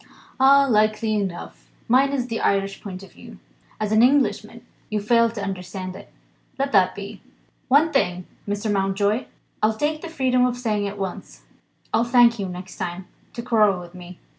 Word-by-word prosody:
"Ah, 275 +1 +6
likely 215 -1 +2
enough! 195 -5 -5 0.2
Mine's 265 +1 +2
the 230 -2 -4
Irish 195 0 0
point 190 -2 -8
of 195 - -15
view. - - -13 0.4
As 215 -1 -2
an 220 +1 +4
Englishman 270 +3 +1 0.2
you 215 - -1
fail 230 +2 +3
to 220 -3 -6
understand 185 -1 -5
it. - - -13 0.5
Let 275 +1 -1
that 190 -4 +3
be. 200 0 -8 0.5
One 300 +5 +4
thing; 180 -9 0 0.2
Mr. 205 +1 -2
Mountjoy, 200 +4 0 0.4
I'll 215 0 +1
take 305 +4 -1
the 340 - -7
freedom 260 -5 +1
of 250 -1 0
saying 210 -4 -1
at 200 +1 -7
once. 195 -2 -7 0.5
I'll 230 - +3
thank 235 -1 +4
you, 195 - -2
next 180 +1 -9
time, 180 0 -5 0.2
to 235 - -6
quarrel 215 -6 +3
with 175 0 -11
Me." 180 -1 -11
215 Hz, 170 wpm, -23 LUFS, 195-245 Hz, 0.5 s, Ah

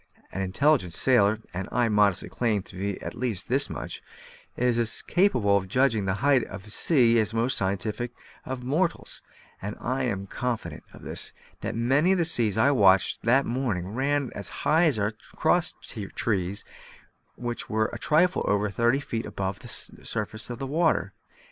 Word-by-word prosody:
An 95 - -4
intelligent 95 - +2
sailor 110 -3 +3
(and 95 +1 -4
I 120 0 +2
modestly 105 -3 +2
claim 110 -5 -1
to - - -10
be 100 +1 -3
at - - -5
least 115 -6 -3
this 135 +3 +2
much) - - -6 0.6
is 125 -1 +2
as 115 -1 +2
capable 125 - +2
of 95 -1 -3
judging 115 -1 +2
the 95 -1 0
height 135 -4 +4
of 95 +1 -9
a 105 - -13
sea 120 -4 +3
as 110 - +1
the 115 - -8
most 115 +3 +2
scientific 105 +5 -1 0.3
of 130 -1 -5
mortals; 160 +8 -1 0.4
and 105 +2 -5
I 130 +2 -1
am 100 -5 -2
confident 110 -7 -4
of - - -14
this, - - -4 0.3
that - - -4
many 135 +10 +3
of - - +1
the 170 - +2
seas 115 - +2
I 135 +6 +4
watched 100 -7 +4
that 130 +4 +3
morning 115 -8 -2
ran 135 +4 -1
as 100 - -5 0.2
high 160 +3 +4
as 145 -8 +2
our 105 +1 0 0.2
cross 170 +2 +2
trees, 100 -2 -3 0.7
which 120 -1 -5
were 110 0 0
a 120 - -5
trifle 170 +7 +2
over 105 0 +1
thirty 120 +7 +2
feet 115 -5 -4
above 95 -2 -4
the - - -11
surface 110 +2 -2
of 120 - -5
the 135 - -4
water. 155 - +1
115 Hz, 180 wpm, -26 LUFS, 100-135 Hz, 0.7 s, height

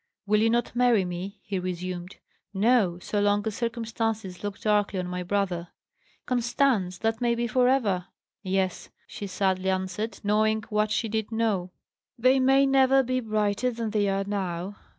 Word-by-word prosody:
"Will 210 +1 +3
you 225 - +4
not 235 +1 0
marry 240 -5 +3
me?" 180 +4 -5
he 195 -2 -3
resumed. 180 0 -5 0.4
"No. 205 -4 +3
So 205 +3 -2
long 205 +1 +2
as 220 - -1
circumstances 225 -4 -3
look 205 -1 -4
darkly 210 -2 +1
on 180 - -2
my 180 0 -4
brother." 180 -2 -1 0.6
"Constance! 240 -6 +1
that 225 +3 -1
may 235 -1 +2
be 235 0 -1
for 250 +2 +2
ever!" 205 -9 +1 0.3
"Yes," 190 -1 -1 0.2
she 205 - -7
sadly 190 -1 0
answered, 190 +4 -2
knowing 215 +1 +2
what 210 -1 +1
she 220 +2 0
did 220 0 -2
know; 215 -5 0 0.5
"they 255 +3 +4
may 270 +1 +5
never 270 0 +4
be 255 +1 0
brighter 215 0 0
than 230 -2 -4
they 205 -2 +1
are 195 0 0
now. 195 -1 -3
210 Hz, 165 wpm, -26 LUFS, 190-230 Hz, 0.6 s, may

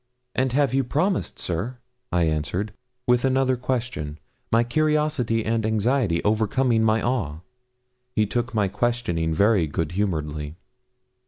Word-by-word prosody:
'And 130 0 +1
have 140 -1 +2
you 135 0 +3
promised, 175 +10 0
sir?' 95 +9 -3 0.3
I 90 -1 +2
answered, 80 +6 -1 0.3
with 125 0 +3
another 130 0 +2
question, 120 - -3 0.3
my 115 +1 +5
curiosity 150 -4 +1
and 115 0 +1
anxiety 110 -4 +1
overcoming 110 +2 +2
my 110 0 +2
awe. 90 - -1 0.7
He 110 - +3
took 120 +4 -2
my 105 -3 +1
questioning 95 -7 0
very 100 +1 +3
good 75 +2 -2
humouredly. 75 -6 -2
110 Hz, 130 wpm, -24 LUFS, 85-125 Hz, 0.7 s, my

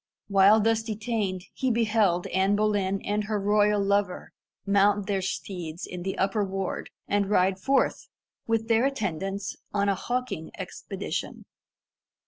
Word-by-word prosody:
While 200 +2 +6
thus 225 +1 +2
detained, 215 -4 -2
he 260 - -1
beheld 215 -6 +2
Anne 190 +2 +3
Boleyn 205 -2 0
and 210 +1 0
her 210 -1 -1
royal 205 +1 +3
lover 200 -2 0 0.3
mount 200 0 +3
their 195 -1 0
steeds 180 -3 -4
in 180 -1 -7
the 190 +2 -3
upper 195 +2 +1
ward, 195 -1 -3 0.2
and 200 -1 +1
ride 190 -1 +2
forth, 270 +6 +1 0.4
with 225 -1 0
their 230 +2 +3
attendants, 195 - -3 0.2
on 200 0 +2
a - - +3
hawking 245 -5 -3
expedition. - - -5
200 Hz, 135 wpm, -27 LUFS, 190-215 Hz, 0.4 s, While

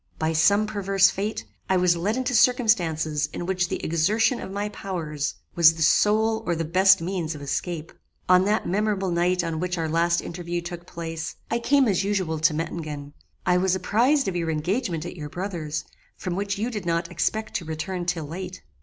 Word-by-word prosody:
By 160 +1 0
some 200 +7 +4
perverse 195 -2 +3
fate, 210 +3 -3 0.2
I 190 - +3
was 180 -1 +3
led 200 +8 -1
into 260 0 -1
circumstances 170 - +2
in 175 - -4
which 180 -1 0
the - - -3
exertion 215 +10 +2
of - - -6
my 205 +2 -3
powers 160 -8 -4 0.2
was 165 -1 +6
the 160 - -1
sole 220 +6 +3
or 175 - +1
the 165 0 -2
best 190 +3 +5
means 170 -3 -2
of 145 - -9
escape. 155 +4 -3 0.4
"On 185 0 +6
that 210 +2 +1
memorable 195 -1 0
night 175 +1 +1
on 165 -2 -2
which 180 +1 -2
our 165 -1 -1
last 170 +2 +2
interview 175 0 -4
took 175 0 -8
place, 165 -1 -5 0.2
I 235 - +1
came 275 +2 +3
as 195 -2 +1
usual 190 -6 -1
to 155 0 +3
Mettingen. 150 -3 -5 0.3
I 180 0 +4
was 185 0 +2
apprized 240 +9 +2
of 190 - -2
your 170 -2 -1
engagement 170 - -1
at 175 - -6
your 150 -4 -7
brother's, 165 -4 -4 0.3
from 180 -2 -3
which 200 0 -2
you 225 +4 -2
did 210 -6 -5
not 170 +1 -1
expect 215 +4 -1
to 170 - -7
return 175 +3 -4
till 170 -4 -1
late. 185 +4 -7
180 Hz, 195 wpm, -25 LUFS, 165-200 Hz, 0.4 s, was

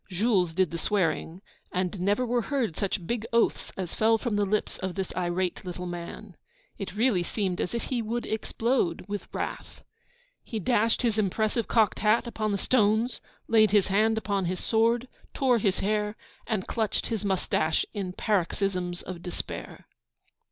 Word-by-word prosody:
Jules 185 -3 +2
did 185 -2 +2
the 170 - -3
swearing; 180 -2 0 0.3
and 180 +1 -1
never 205 +6 +2
were 240 0 +1
heard 235 - -1
such 195 -3 -2
big 235 +3 -1
oaths 235 0 +2
as 185 -3 -4
fell 225 +1 +4
from 225 -2 -2
the 205 -1 +2
lips 210 +2 -1
of 185 -2 -3
this 190 -2 -3
irate 180 0 -1
little 180 -1 -5
man. 175 +3 -7 0.4
It 195 -1 -5
really 220 -4 +3
seemed 185 0 -1
as 210 - -2
if 235 - -2
he 250 -3 -1
would 230 +2 -2
explode 225 -4 0
with 205 0 -5
wrath. - - -5 0.6
He 225 - -5
dashed 230 +2 +2
the 225 -3 +2
impressive 215 +3 +1
cocked 220 -3 +3
hat 220 +3 +3
upon 215 -2 -2
the 200 - +1
stones, 220 +2 +2 0.3
laid 220 -2 +5
his 205 -1 +3
hand 220 +3 +3
upon 200 -3 0
his 180 +1 -1
sword, 230 +2 +2 0.3
tore 255 -3 +3
his 195 -3 +1
hair, 210 +1 0 0.3
and 215 -5 -1
clutched 220 -3 -1
his 225 -3 -2
moustache 180 -5 +1
in 195 -4 -3
paroxysms 185 -3 0
of 180 -2 -7
despair. 170 - -6
205 Hz, 165 wpm, -28 LUFS, 185-225 Hz, 0.6 s, laid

